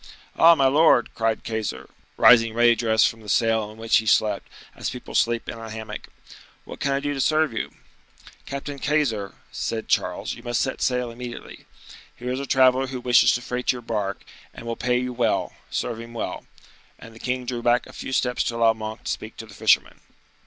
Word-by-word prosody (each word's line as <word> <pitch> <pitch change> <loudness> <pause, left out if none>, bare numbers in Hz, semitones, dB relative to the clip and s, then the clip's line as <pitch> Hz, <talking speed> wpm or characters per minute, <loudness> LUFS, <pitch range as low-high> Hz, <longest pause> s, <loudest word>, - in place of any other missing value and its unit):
"Ah, 170 +1 +7
my 135 - +2
lord!" 140 -3 +4
cried 115 -1 -1
Keyser, 110 -2 -4 0.3
rising 115 -2 +6
ready 120 0 +5
dressed 110 -1 +3
from 115 - -6
the 105 - -10
sail 110 +2 +2
in 110 - -13
which 115 0 +3
he 110 - -1
slept, 105 0 +2 0.3
as - - -3
people 125 - -9
sleep 115 0 +1
in 115 - -6
a 115 0 -8
hammock. 110 -1 -7 0.6
"What - - -10
can 140 - 0
I 135 - +1
do 145 0 -2
to 135 - -2
serve 155 -3 +2
you?" 110 - -3 0.8
"Captain 140 +1 -5
Keyser," 130 -10 0 0.2
said 110 -1 -3
Charles, - - 0
"you - - -11
must 120 -1 -1
set 130 - -2
sail 125 -2 0
immediately. 120 0 -9 0.5
Here 125 +1 -5
is 130 - -2
a 140 - -5
traveler 130 0 +4
who 130 -1 -5
wishes 125 -1 +5
to 120 - -2
freight 125 0 -1
your 125 -2 -7
bark, 105 -4 -3 0.3
and - - -10
will 115 0 -3
pay 125 0 0
you 125 0 -2
well; 120 -2 0 0.2
serve 115 -2 -3
him 115 0 -10
well." 115 - -5 0.5
And 115 - -13
the 115 - -14
king 125 +1 -2
drew 120 -1 -3
back 120 +1 +2
a - - -14
few - - -7
steps 125 -1 0
to 115 - -2
allow 115 -1 +4
Monk 110 0 -7
to - - -2
speak 110 - -6
to 115 - -7
the 105 - -15
fisherman. - - +2
120 Hz, 210 wpm, -24 LUFS, 110-125 Hz, 0.8 s, Ah